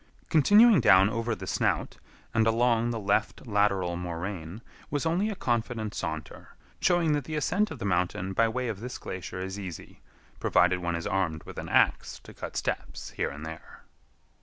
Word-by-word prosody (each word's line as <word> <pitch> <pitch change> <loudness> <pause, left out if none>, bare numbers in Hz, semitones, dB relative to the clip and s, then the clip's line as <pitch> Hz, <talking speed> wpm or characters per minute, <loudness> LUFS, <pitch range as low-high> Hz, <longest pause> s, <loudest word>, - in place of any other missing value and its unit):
Continuing 205 - +6
down 95 -2 +6
over 115 0 -1
the - - -8
snout, - - -1 0.4
and 110 0 +3
along 115 0 +2
the 120 - -2
left 105 +4 0
lateral 100 -5 +1
moraine, 90 +3 -5 0.3
was 145 +2 -2
only 180 +6 +1
a 210 - -3
confident 115 - -2
saunter, 80 -2 -6 0.2
showing 175 -3 +3
that 145 -3 -1
the 155 - -4
ascent 195 +9 +1
of - - -7
the 115 - -5
mountain 90 0 -1
by 115 +4 +3
way 125 +2 -2
of 110 -4 -4
this 125 +3 -6
glacier 90 0 -6
is 95 +1 -5
easy, 90 -5 -9 0.4
provided 90 +1 +3
one 85 -1 -2
is 85 - -4
armed 90 -5 -1
with - - -8
an - - -6
ax - - +2
to - - -12
cut - - -7
steps - - -4
here - - -2
and 75 +3 -8
there. 80 0 -10
105 Hz, 180 wpm, -28 LUFS, 90-125 Hz, 0.4 s, Continuing